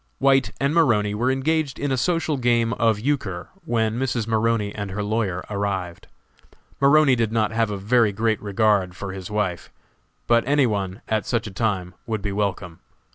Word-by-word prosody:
White 135 0 +3
and 140 +2 +1
Maroney 110 -11 +3
were 120 +5 0
engaged 140 +1 0
in 145 -1 -2
a - - +2
social 160 +4 0
game 120 -2 +2
of 115 -3 +1
euchre 110 -9 -2 0.2
when 115 0 0
Mrs. 125 -4 -1
Maroney 110 -2 0
and 100 -2 -5
her 100 +2 -3
lawyer 100 -4 -1
arrived. 100 -4 -3 0.7
Maroney 140 -1 +5
did 115 -3 0
not 110 -2 +1
have 115 -1 +1
a 100 - -3
very 105 +2 +2
great 110 +2 0
regard 100 -3 +1
for 100 0 -6
his 95 0 -7
wife, 105 -4 -2 0.5
but 115 0 +3
any 145 -1 +4
one, 100 -2 -2
at 110 -2 -1
such 120 -2 0
a 105 - -6
time, 95 -4 -2
would 110 -3 -3
be 100 - -2
welcome. 95 -4 -3
110 Hz, 180 wpm, -23 LUFS, 100-125 Hz, 0.7 s, Maroney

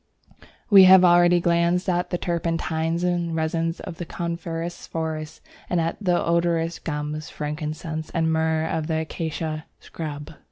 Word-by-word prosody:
We 195 -2 +10
have 185 0 +8
already 175 0 +5
glanced 170 +1 +1
at 175 -1 0
the 175 - -1
turpentines 165 -1 -1
and 175 -2 0
resins 165 +1 -1
of 165 - -8
Coniferous 170 0 -5
forests 160 -1 -4 0.3
and 175 - +1
at 165 0 -1
the 180 -3 +2
odorous 170 0 +1
gums, 150 0 -4
frankincense, 155 +1 -5
and 160 -1 0
myrrh 160 0 +1
of 160 -1 -2
the 160 -1 0
Acacia 160 -1 -4
scrub. 150 -2 -7
165 Hz, 135 wpm, -24 LUFS, 160-175 Hz, 0.3 s, We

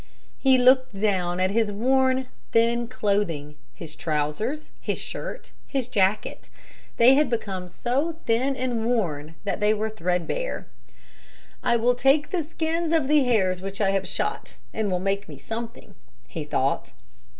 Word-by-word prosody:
He 265 -1 +5
looked 255 -4 +4
down 185 -4 +1
at 185 +1 +2
his 220 0 +1
worn, 260 +4 +2 0.3
thin 235 +1 +3
clothing, 200 - -1 0.2
his 155 -2 -10
trousers, 160 - -2
his - - -2
shirt, - - -6 0.2
his 265 -4 -2
jacket; 205 -2 0 0.5
they 240 +3 +7
had 295 +2 +3
become 195 -6 -3
so 270 - -1
thin 255 +4 +1
and 245 -3 -1
worn 160 -10 -1
that 200 - -2
they 210 +1 +3
were 215 +1 -2
threadbare. 180 - -2 1.0
"I 240 - +2
will 240 +2 +3
take 270 +4 +3
the 360 - +1
skins 325 +1 -2
of 315 -5 +2
the 295 -1 +5
hares 190 -7 +2
which 195 +1 -6
I 195 -2 +3
have 195 -1 0
shot 420 - -3 0.2
and 220 -2 -1
will 180 - +1
make 195 0 -2
me 145 - -9
something," 225 - -7 0.3
he - - -5
thought. - - -1
225 Hz, 150 wpm, -25 LUFS, 190-260 Hz, 1.0 s, they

